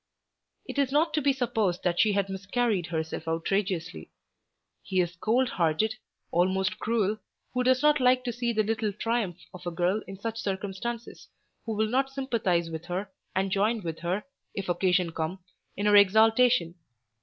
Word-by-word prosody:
It - - -4
is 275 -2 +2
not 305 +4 +2
to 305 - +1
be 280 0 +3
supposed 225 -8 0
that 175 -1 0
she 215 -2 +4
had 200 -1 +1
miscarried 195 0 -1
herself 160 0 -4
outrageously. 165 - -2 0.7
He 190 -1 -1
is 175 -1 0
cold 235 +8 +2
hearted, 170 +6 +1 0.4
almost 190 +3 +1
cruel, 215 -2 0 0.3
who 250 - +1
does 255 +2 +3
not 300 -1 +5
like 255 0 +4
to 245 -2 -2
see 240 0 -1
the 220 -1 +1
little 220 0 -1
triumph 215 -4 -1 0.2
of 180 - -10
a - - +1
girl 180 +5 0
in 195 - -8
such 225 +3 -4
circumstances, 205 +4 -4 0.4
who 220 - -1
will 220 +1 +2
not 265 +4 +1
sympathise 225 -11 0
with 160 +1 -6
her, 190 +3 -4 0.2
and 190 +1 0
join 210 +3 +1
with 165 -1 -4
her, 180 +5 -2 0.3
if 195 -3 -4
occasion 180 -1 +2
come, 160 +3 -3 0.4
in 200 - -1
her 205 0 +5
exaltation. 220 0 +5
205 Hz, 170 wpm, -28 LUFS, 180-235 Hz, 0.7 s, not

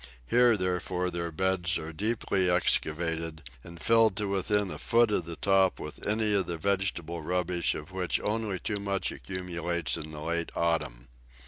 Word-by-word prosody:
Here, 120 - +4
therefore, 90 -1 -1
their 85 0 -3
beds 95 +1 0
are 80 +1 -6
deeply 100 -1 0
excavated, 80 -3 0 0.2
and 85 0 -10
filled 115 -1 +4
to 105 -1 0
within 100 0 +1
a 75 - -7
foot 115 -1 +3
of 90 -5 0
the 85 -1 -5
top 95 0 +2
with - - -8
any 105 0 +3
of 100 -2 +2
the 85 - -2
vegetable 85 -2 -1
rubbish 90 0 0
of 75 +5 -8
which 90 -1 -1
only 105 -2 -1
too 105 +3 -3
much 100 -1 -1
accumulates 85 -2 -3
in 75 - -7
the 75 -1 -8
late 85 +1 -2
autumn. 80 -7 -1
90 Hz, 165 wpm, -29 LUFS, 85-100 Hz, 0.2 s, Here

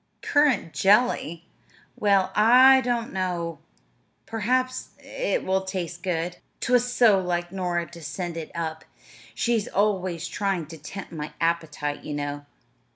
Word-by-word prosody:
"Currant 290 - +2
jelly? 195 -6 +2 0.5
Well, 195 -2 +2
I 255 +5 +7
don't 240 -1 -1
know, 175 -3 -2 0.7
perhaps 255 +4 -1
it - - -2
will 190 0 +1
taste 180 -2 -5
good. 175 -1 -2 0.2
'T 250 - -1
was 245 0 +3
so 225 -5 +5
like 175 -1 -2
Nora 180 -3 -1
to 170 - -11
send 170 +3 -5
it 165 -2 -6
up; 160 -1 -4 0.5
she's 230 - 0
always 185 -4 0
trying 195 -2 -1
to 165 - -9
tempt 185 +6 -8
my 150 -2 -6
appetite, 160 -3 -1
you 150 - -5
know. 145 0 -4
185 Hz, 135 wpm, -25 LUFS, 170-225 Hz, 0.7 s, I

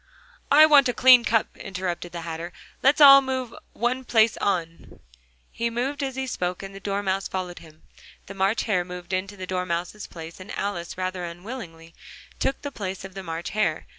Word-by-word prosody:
"I 305 +2 +9
want 285 -4 +6
a 245 - -2
clean 255 -2 +7
cup," 225 -1 0
interrupted 185 -2 -5
the 170 - -6
Hatter, 165 +1 -6 0.3
"let's 275 +3 +4
all 275 -1 +10
move 260 -3 -3 0.2
one 250 +2 -1
place 225 -2 +3
on." 170 -4 -3 0.5
He 235 0 -2
moved 260 +5 -2
as 265 -2 -3
he 265 0 -2
spoke, 180 -7 -3
and 195 0 -8
the 195 - -9
Dormouse 195 -1 -2
followed 180 -2 -5
him: 155 -1 -17 0.4
the 195 - -9
March 195 +3 +1
Hare 185 -5 +1
moved 180 0 -8
into 195 +2 -3
the 185 - -6
Dormouse's 180 +2 -3
place, 165 +1 -10
and 185 - -9
Alice, 180 -5 -4
rather 185 -1 -3
unwillingly, 170 -2 -8 0.5
took 270 - -1
the 285 - -4
place 190 -5 -5
of 190 - -10
the 195 - -6
March 165 -1 -5
Hare. 200 -7 0
195 Hz, 185 wpm, -25 LUFS, 175-240 Hz, 0.5 s, all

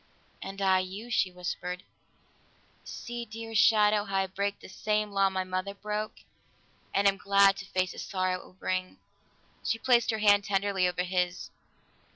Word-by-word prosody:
"And 195 +1 -5
I 190 -1 +4
you," 195 +6 -6
she 190 -5 +2
whispered. 180 0 -5 1.0
"See, 240 0 -6
dearest 225 -1 -1
shadow, 210 -1 +4
how 195 -2 -4
I 195 0 +2
break 200 +2 -3
the - - -12
same 210 +2 -1
law 195 -1 +3
my 190 -1 -2
mother 185 +2 -3
broke, 210 +1 -4 0.7
and 200 +1 +3
am 195 0 +3
glad 200 0 +5
to 200 - -7
face 185 -2 -1
the - - -9
sorrow 185 -1 -1
it - - -14
will - - -17
bring." 185 0 -3 0.7
She 225 - 0
placed 240 0 +3
her 220 - +1
hand 205 -1 +5
tenderly 195 -2 +1
over 180 0 -1
his. 180 0 -2
195 Hz, 170 wpm, -29 LUFS, 185-210 Hz, 1.0 s, glad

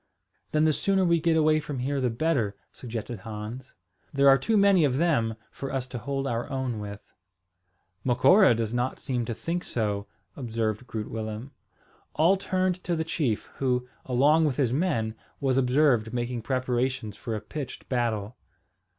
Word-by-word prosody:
"Then 155 0 +3
the 155 - +4
sooner 195 +3 +2
we 170 -2 +3
get 165 0 +3
away 155 0 +4
from 145 -2 -5
here 135 +2 -1
the 125 - +2
better," 115 -5 0 0.2
suggested 115 -2 -6
Hans. 110 +5 -7 0.4
"There 140 0 +3
are 135 - +7
too 220 - +1
many 200 -4 +5
of 135 -3 +2
them 140 -9 +2 0.2
for 135 - -6
us 135 -2 -2
to 125 - -5
hold 135 +3 -3
our 120 0 -2
own 130 -5 -2
with." 105 0 -7 1.0
"Macora 130 - +5
does 115 0 -2
not 125 +2 -1
seem 125 -4 -2
to 115 - -3
think 175 +8 -3
so," 105 -3 -2 0.3
observed 115 -2 -2
Groot 110 -1 -5
Willem. 110 +3 -5 0.6
All 165 +6 +5
turned 185 -1 -1
to 175 - 0
the 160 - -1
chief, 150 -9 -2
who, 125 -2 0 0.2
along 145 +6 +4
with 140 -4 0
his 130 -5 +1
men, 135 -9 0 0.3
was 135 -2 +1
observed 125 -3 +3
making 120 0 -2
preparations 125 -2 -1
for 115 0 -4
a - - -2
pitched 130 +6 -7
battle. 115 -3 -1
130 Hz, 165 wpm, -27 LUFS, 115-150 Hz, 1.0 s, are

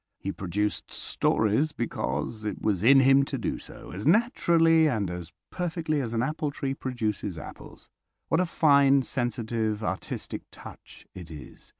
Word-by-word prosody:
He 100 - -4
produced 100 +3 -3
stories 110 +9 +1
because 110 - -3
it 105 -3 -3
was 100 -3 0
in 135 +3 +7
him 135 +1 +5
to 140 -1 -4
do 110 - -3
so, - - -12
as 100 +8 -4
naturally 165 - +4
and 105 -8 -1
as 90 -1 -7 0.2
perfectly 165 -4 -1
as 115 -2 -4
an 115 - +1
apple 150 +2 -2
tree 140 -1 -3
produces 110 -8 -3
apples. 80 - -11 0.4
What 160 - +2
a 185 - 0
fine, 140 -4 +4
sensitive, 115 -4 -2
artistic 95 -2 -4
touch - - -13
it 90 -3 -10
is! 75 -3 -11
120 Hz, 155 wpm, -27 LUFS, 105-150 Hz, 0.4 s, in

